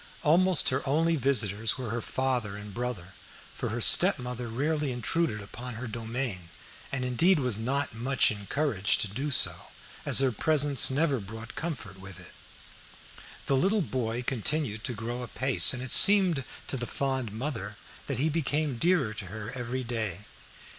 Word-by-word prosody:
Almost 175 +1 +4
her 130 +1 -1
only 165 +3 +2
visitors 115 -6 0
were 125 -5 -5
her 120 +1 -3
father 125 -7 -2
and 105 0 -9
brother, 120 -7 -5 0.4
for - - -4
her 120 +2 -4
stepmother 125 - +4
rarely 145 +4 -2
intruded 125 0 -1
upon 120 +4 -8
her 120 +3 -6
domain, 115 -5 -4 0.4
and 130 -2 -2
indeed 160 +10 +3
was 125 -7 0
not 135 +4 -2
much 125 +3 +2
encouraged 105 +1 0
to - - 0
do 130 +10 -4
so, 140 - +1 0.4
as - - +3
her 135 -1 +4
presence 145 +3 +3
never 140 0 +1
brought 110 +3 -9
comfort 120 - -6
with 95 -1 -10
it. 90 - -12 1.1
The 135 - +1
little 195 +8 +2
boy 120 -4 -3
continued 125 -2 -1
to 130 - -2
grow 120 +3 -5
apace, 130 +2 +4
and 130 0 -3
it 130 - -3
seemed 185 -9 +6 0.2
to 135 - -3
the 120 -1 -4
fond 130 -5 -2
mother 105 -4 -5 0.3
that 140 - -3
he 140 +5 +1
became 150 -4 -1
dearer 165 -10 +2
to 100 - -5
her 110 +4 -7
every 125 0 -4
day. 110 -6 -4
125 Hz, 160 wpm, -28 LUFS, 110-140 Hz, 1.1 s, seemed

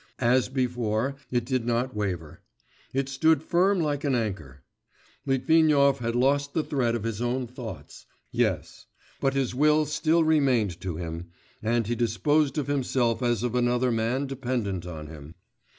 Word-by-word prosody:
As 125 0 +2
before, 125 -1 -1
it 120 -2 0
did 130 -2 -1
not 120 +1 -1
waver; 90 -7 -4 0.5
it 135 0 -1
stood 155 +3 +2
firm 185 +4 +2
like 145 -3 -1
an 140 -3 +1
anchor. 80 - -4 0.6
Litvinov 140 0 +4
had 115 0 -2
lost 140 +3 +1
the 160 - +2
thread 125 -6 0
of 115 - -3
his 115 -1 -3
own 125 +1 -1
thoughts... 115 - -9 0.2
yes; - - -1 0.3
but 135 0 0
his 135 -3 0
will 150 +3 +3
still 160 +2 +2
remained 130 - +2
to 90 -3 -4
him, 85 0 -5 0.3
and 115 +1 +1
he 115 - -1
disposed 135 +5 +1
of 145 - 0
himself 130 -4 0
as 120 -2 +1
of 120 -1 -1
another 125 0 +2
man 115 +4 0
dependent 120 -9 -3
on 80 -3 -7
him. 75 0 -11
125 Hz, 155 wpm, -26 LUFS, 110-140 Hz, 0.6 s, Litvinov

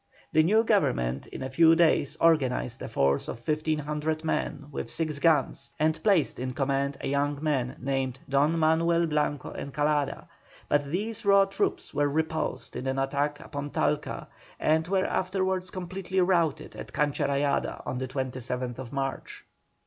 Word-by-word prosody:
The 155 - +6
new 215 +8 +4
Government 65 - +1
in - - -7
a 130 - -3
few 165 +3 +6
days 155 -3 +3
organized 130 -6 +2
a - - -4
force 70 0 +1
of 115 +1 -7
1,500 155 0 -1
men 150 -2 -2
with - - -5
six 155 -3 -2
guns, 150 -3 +2
and 155 +1 +1
placed 190 - +2
in 130 0 -3
command 140 0 0
a - - -3
young 140 +1 0
man 130 -5 0
named 130 -1 -2
DON 145 +4 +2
MANUEL 165 +1 +3
BLANCO 150 -3 -1
ENCALADA, 145 +1 -1 0.4
but 145 0 +2
these 220 +6 -3
raw 200 -1 +6
troops 195 0 -2
were 145 0 +2
repulsed 160 +2 -2
in 125 +2 -4
an 130 0 -1
attack 140 +2 0
upon 145 -3 -5
Talca, 150 +1 -1 0.3
and 160 +1 +2
were 190 0 +1
afterwards 185 0 -1
completely 185 +1 -3
routed 175 -5 +1
at - - -8
Cancha 145 -1 0
Rayada 140 0 0
on 125 - -3
the 130 - -3
27th 125 -1 -4
March. 135 -1 -4
150 Hz, 155 wpm, -28 LUFS, 135-165 Hz, 0.4 s, The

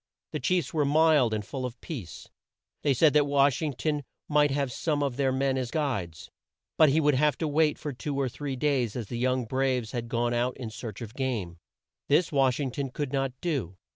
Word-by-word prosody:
The - - -3
chiefs 180 -8 0
were 155 -2 +2
mild 150 -4 +4
and 105 -1 -2
full 130 +5 -5
of 125 -1 -5
peace. 115 - -7 0.5
They 145 - +2
said 155 +3 +5
that 150 -1 +4
Wash 140 -1 +3
ing 150 -3 -1
ton 150 +3 -1 0.2
might 150 -1 +4
have 140 -2 -1
some 145 +2 -1
of 135 -3 -1
their 135 -1 +1
men 130 0 +1
as 125 -2 -3
guides, 120 - -3 0.4
but 155 -2 +6
he 150 +4 +3
would 150 -1 +3
have 150 +2 +2
to 160 - -1
wait 150 0 +2
for 145 - -5
two 140 +3 -4
or 135 - +1
three 135 +2 -4
days 130 -5 0
as 115 -5 -5
the 120 - -4
young 130 0 +1
braves 130 -2 0
had 120 -2 -4
gone 120 0 0
out 120 +1 0
in 120 -4 -6
search 110 -3 -7
of 110 -1 -9
game. 115 -11 -3 0.5
This 155 +4 +3
Wash 135 -3 +2
ing 135 -3 -1
ton 135 +1 -3
could 145 0 -4
not 135 -1 0
do. 130 - -2
135 Hz, 220 wpm, -28 LUFS, 120-145 Hz, 0.5 s, but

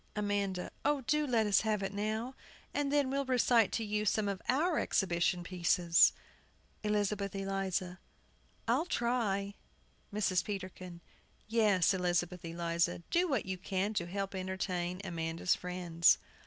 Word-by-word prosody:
AMANDA. 200 -3 -1
Oh, 290 -2 +2
do 300 +4 +1
let 230 -4 +2
us 205 -1 +4
have 215 -2 0
it 195 0 -3
now; 215 +5 -2 0.4
and 285 -1 0
then 285 -2 +2
we'll 275 +1 0
recite 245 -4 +3
to 225 - 0
you 210 0 -1
some 210 0 +1
of 195 -2 -3
our 315 +6 +2
exhibition 175 -1 +1
pieces. 175 -1 +4 0.7
ELIZABETH 205 -1 0
ELIZA. 195 -2 -2 0.7
I'll 255 +8 +2
try. 220 - 0 0.6
MRS. 200 -3 +1
PETERKIN. 185 -3 -6 0.5
Yes, 210 -5 +3
Elizabeth 180 -1 -1
Eliza, 170 0 -1
do 355 +2 +3
what 265 -7 0
you 190 -1 -4
can 195 +3 -1
to 175 -5 -1
help 195 +2 -3
entertain 185 -1 -3
Amanda's 165 -1 -1
friends. 175 -2 +2
195 Hz, 135 wpm, -33 LUFS, 180-220 Hz, 0.7 s, us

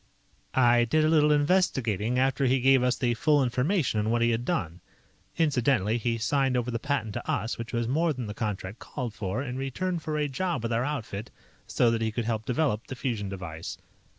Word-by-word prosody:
"I 120 -2 +5
did 155 +6 +2
a - - +4
little 150 -1 +4
investigating 130 - +1
after 135 +1 +2
he 130 +1 +3
gave 135 +1 +5
us 125 0 +1
the 120 -2 +1
full 145 +5 +3
information 125 - +1
on 105 +1 0
what 115 +1 +2
he 120 - +3
had 115 +1 -1
done. 85 -4 -2 0.6
(Incidentally, 125 - +2
he 115 0 -1
signed 135 +2 +1
over 125 0 -1
the 115 - -2
patent 120 -6 -2
to - - -6
us, 115 +2 -1
which 115 0 -5
was 120 -1 -1
more 160 +6 +2
than 130 -5 -4
the 105 - -5
contract 105 -1 -4
called 125 -6 -5
for, 110 +2 -3
in 125 -2 -5
return 170 +7 -2
for 155 -1 -3
a 150 -1 +1
job 145 -1 -2
with 115 0 -1
our 115 +2 +1
outfit, 120 -6 -4 0.4
so 120 -2 +2
that 115 -1 -1
he 110 -1 0
could 115 +1 -3
help 110 -1 -2
develop 125 -4 0
the 130 - -6
fusion 115 -7 -3
device.) 85 -4 -6
125 Hz, 210 wpm, -27 LUFS, 115-140 Hz, 0.6 s, I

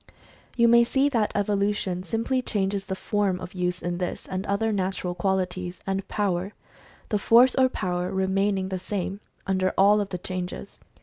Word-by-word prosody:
You 235 -1 +4
may 235 0 +7
see 270 +4 +2
that 230 -6 +1
evolution 200 -2 0
simply 230 +7 -1
changes 200 -3 -1
the 190 - -2
form 200 -2 0
of 180 0 -8
use 180 -1 -2
in 175 0 -2
this 180 - -4
and 190 +2 -4
other 210 +3 +1
natural 190 -2 -2
qual 190 +2 +1
ities, 180 -1 -4
and 195 0 -2
power 195 -1 -1 0.3
— - - -26
the 210 - +1
force 240 +5 +6
or 260 -1 +4
power 180 -5 -2
remaining 190 0 0
the 190 -1 -3
same, 195 +1 -4 0.3
under 185 -1 0
all 205 +2 +5
of 200 - -4
the 180 - -3
changes. 180 0 -5
195 Hz, 180 wpm, -25 LUFS, 185-210 Hz, 0.3 s, may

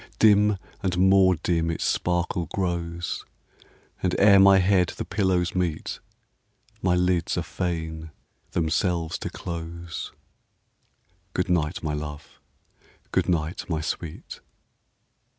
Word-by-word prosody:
Dim 105 -1 +5 0.2
and 90 -2 -1
more 95 0 +5
dim 85 +1 0
its 80 - -2
sparkle 90 -1 0
grows, 85 -2 -2 0.8
And 90 -1 0
ere 100 -1 +7
my 95 0 +7
head 95 -1 +3
the - - -3
pillows 90 -3 0
meet, 90 -4 -2 0.8
My 90 -1 +2
lids 90 -1 +1
are - - 0
fain 80 -3 -4 0.4
themselves 85 0 0
to - - -4
close. 85 0 -6 1.2
Good 90 +1 0
night, 85 -1 0
my 75 -1 -1
love! 75 0 -7 0.7
good - - +1
night, 85 0 -1
my 80 -2 -1
sweet! 80 0 -5
90 Hz, 115 wpm, -25 LUFS, 80-95 Hz, 1.2 s, ere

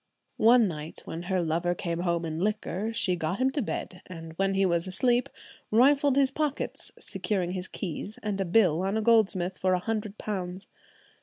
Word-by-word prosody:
One 230 0 +6
night 155 -2 -6
when 165 - -5
her 185 -2 +1
lover 170 +2 0
came 170 -1 -3
home 170 -1 0
in 160 0 -4
liquor, 210 +1 -1
she 205 -5 +2
got 165 +2 -2
him 260 +1 +2
to 285 - -1
bed, 185 -4 -4
and 165 -2 -9
when 195 +3 0
he 195 0 +3
was 170 -1 +1
asleep 240 +6 +1 0.4
rifled 275 +4 +4
his 275 -1 +3
pockets, 295 0 -3
securing 185 -5 -2
his 185 0 -3
keys 200 +3 -5
and 205 -2 -1
a - - 0
bill 175 -3 +3
on 195 +3 0
a - - +1
goldsmith 195 -5 +2
for 185 0 +2
a 180 - +2
hundred 215 +1 -3
pounds. 190 -2 -4
190 Hz, 185 wpm, -28 LUFS, 175-225 Hz, 0.4 s, One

